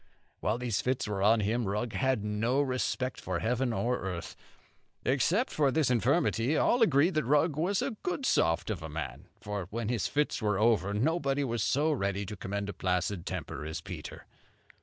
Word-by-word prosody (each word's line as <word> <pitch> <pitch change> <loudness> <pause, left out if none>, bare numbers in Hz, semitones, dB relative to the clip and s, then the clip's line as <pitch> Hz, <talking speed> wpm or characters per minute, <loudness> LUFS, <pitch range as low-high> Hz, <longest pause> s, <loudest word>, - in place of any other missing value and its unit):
While 105 - 0
these 120 -4 -1
fits 130 -2 -1
were 100 -2 -2
on 110 +2 +4
him, 115 +3 0
Rugg 105 +3 -2
had 130 -5 +1
no 110 +5 0
respect 130 -1 -1
for 90 -1 -2
heaven 120 +5 0
or 120 +2 0
earth. 90 -3 -5 0.7
Except 170 - +1 0.2
this 155 -5 +3
infirmity, 130 +2 +2
all 245 - +3
agreed 165 -3 +4
that 155 -1 +1
Rugg 145 +4 +2
was 180 +6 +1
a - - -2
good 330 -7 -2
soft 80 - +2
of 95 -5 -4
a 80 - -6
man; 80 +2 -6
for 100 -3 -4
when 115 +1 -3
his 120 -4 0
fits 145 -3 0
were 105 -2 +1
over, 105 -2 +3
nobody 140 +5 +1
was 120 -4 -1
so 145 +9 +2
ready 100 -7 -1
to 105 - -6
commend 100 +1 -4
a 105 - -4
placid 90 0 -1
temper 65 - -4
as 80 +1 -4
Peter. 85 -2 -8
115 Hz, 180 wpm, -30 LUFS, 100-140 Hz, 0.7 s, on